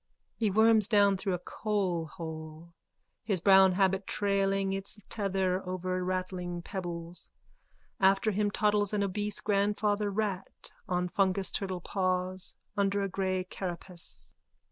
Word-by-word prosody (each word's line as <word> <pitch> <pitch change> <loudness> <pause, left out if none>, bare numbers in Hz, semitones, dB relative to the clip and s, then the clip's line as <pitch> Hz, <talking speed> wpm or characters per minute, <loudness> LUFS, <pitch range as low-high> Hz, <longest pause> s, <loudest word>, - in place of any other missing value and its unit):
_(He 215 -3 +3
worms 220 0 +5
down 205 -3 +4
through 190 0 -1
a 180 - -9
coalhole, 165 -5 -3 0.5
his 200 -4 0
brown 190 +1 +6
habit 190 0 +1
trailing 195 -1 +1
its 195 +2 -3
tether 190 -3 0
over 185 0 -2
rattling 180 -1 -3
pebbles. 175 -2 -5 0.7
After 195 +3 +4
him 205 +1 +1
toddles 210 -1 +2
an 205 -1 +1
obese 205 +1 -2
grandfather 205 0 +1
rat 200 -2 -3 0.2
on 180 0 0
fungus 190 +1 +1
turtle 185 -3 -3
paws 185 0 -1 0.2
under 200 -1 +1
a 195 - -1
grey 185 0 -1
carapace. 180 -1 -5
190 Hz, 120 wpm, -30 LUFS, 180-205 Hz, 0.7 s, brown